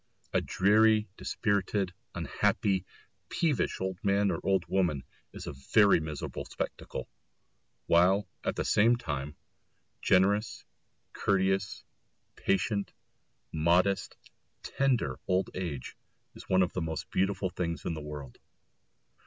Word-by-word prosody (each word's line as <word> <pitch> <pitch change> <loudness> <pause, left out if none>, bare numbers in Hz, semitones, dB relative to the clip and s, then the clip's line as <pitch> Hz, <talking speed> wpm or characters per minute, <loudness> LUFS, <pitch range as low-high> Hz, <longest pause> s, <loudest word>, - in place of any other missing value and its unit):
A - - +3
dreary, 110 +2 +4
dispirited, 100 -2 -1 0.2
unhappy, 95 -2 0 0.4
peevish 155 -6 0
old 95 +3 -4
man 100 0 +3
or 85 - -2
old 95 -2 +1
woman 85 -8 0 0.3
is - - -8
a - - -5
very 100 +10 +4
miserable 80 -2 -5
spectacle; - - -5 0.8
while, 95 +4 +4 0.2
at - - -1
the - - -2
same 115 +4 +4
time, 75 - -4 0.7
generous, 100 +4 +2 0.5
courteous, 95 0 0 0.5
patient, 100 +1 0 0.6
modest, 90 +5 +2 0.5
tender 125 - 0
old 95 +1 +1
age 85 -8 -5 0.4
is - - -13
one 95 0 +5
of 90 - -2
the 90 - -2
most 80 -1 -4
beautiful 95 -1 0
things 85 -4 -3
in - - -1
the 80 - -5
world. 75 -4 -8
95 Hz, 115 wpm, -30 LUFS, 85-100 Hz, 0.8 s, one